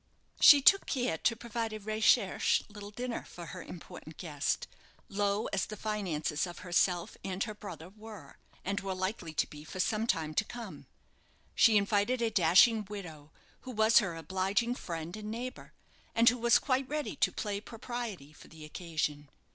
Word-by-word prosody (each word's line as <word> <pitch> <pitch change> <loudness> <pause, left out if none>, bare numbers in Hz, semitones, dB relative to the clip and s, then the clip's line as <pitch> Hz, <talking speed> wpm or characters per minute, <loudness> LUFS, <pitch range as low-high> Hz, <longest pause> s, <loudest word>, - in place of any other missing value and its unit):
She 285 -3 +9
took 395 +6 +6
care 245 - -1
to 230 - +2
provide 230 -1 -4
a 215 - -5
recherché 215 +1 +2
little 205 -1 -8
dinner 240 +3 -4
for - - -9
her - - -8
important - - -10
guest, - - -2 0.4
low 205 +1 0
as 195 - 0
the 215 - -7
finances 185 -8 -2
of 175 - -9
herself 175 0 +1
and 190 0 -2
her 215 - -5
brother 180 -6 -9
were 215 +1 -12 0.3
and 200 +2 -1
were 195 -1 -4
likely 185 -2 -3
to - - +2
be 150 0 -11
for 175 +4 -9
some 215 +4 0
time 160 -6 0
to 220 - +2
come. 235 +2 -9 0.7
She 225 -3 +6
invited 205 +4 +1
a 230 -1 0
dashing 205 +4 +5
widow, 160 -8 -8 0.3
who - - -11
was 220 -2 +5
her 190 -6 -2
obliging 190 +8 0
friend 170 -6 -6
and 215 0 -7
neighbour, 245 +3 -6 0.4
and 230 +1 +4
who 245 0 -2
was 235 0 +5
quite 265 -1 0
ready 300 0 -3
to - - +2
play 205 -2 -3
propriety 225 - -6
for - - -15
the 155 -1 -12
occasion. 150 -3 -3
205 Hz, 170 wpm, -31 LUFS, 175-230 Hz, 0.7 s, She